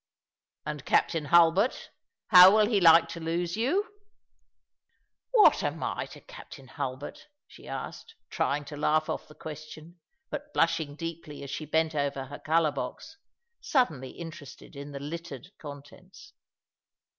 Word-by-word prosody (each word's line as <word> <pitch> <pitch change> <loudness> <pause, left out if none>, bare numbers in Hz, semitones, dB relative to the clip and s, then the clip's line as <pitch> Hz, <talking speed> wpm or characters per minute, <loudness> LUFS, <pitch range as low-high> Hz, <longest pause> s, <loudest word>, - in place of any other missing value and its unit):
" - - -64
And 150 -2 -5
Captain 160 0 +1
Hulbert 170 - +3 0.2
— - - -62
how 185 +2 +10
will 215 - +5
he 210 -2 +1
like 165 -1 +7
to 170 - -7
lose 170 +2 -2
you? 390 - -1 0.4
" - - -57
" - - -49
What 440 -4 +6
am - - -3
I - - -3
to - - -13
Captain 150 - -13
Hulbert? 140 - -6
" - - -65
she - - -15
asked, 455 - -7 0.2
trying 145 +1 -1
to 150 - -8
laugh 155 +1 +1
off - - -5
the 150 - -16
question, 155 +2 -10 0.3
but 295 0 -6
blushing 165 -3 +1
deeply 165 -2 -7
as 140 - -7
she 150 +3 -5
bent 160 +1 +1
over 140 -2 -2
her 145 +2 -9
colour 160 -1 +2
box, 230 - -7 0.4
suddenly 155 - 0
interested 160 -6 -11
in 140 +1 -8
the 140 - -6
littered 160 +1 -7
contents. 155 - -12
160 Hz, 155 wpm, -28 LUFS, 145-185 Hz, 0.4 s, how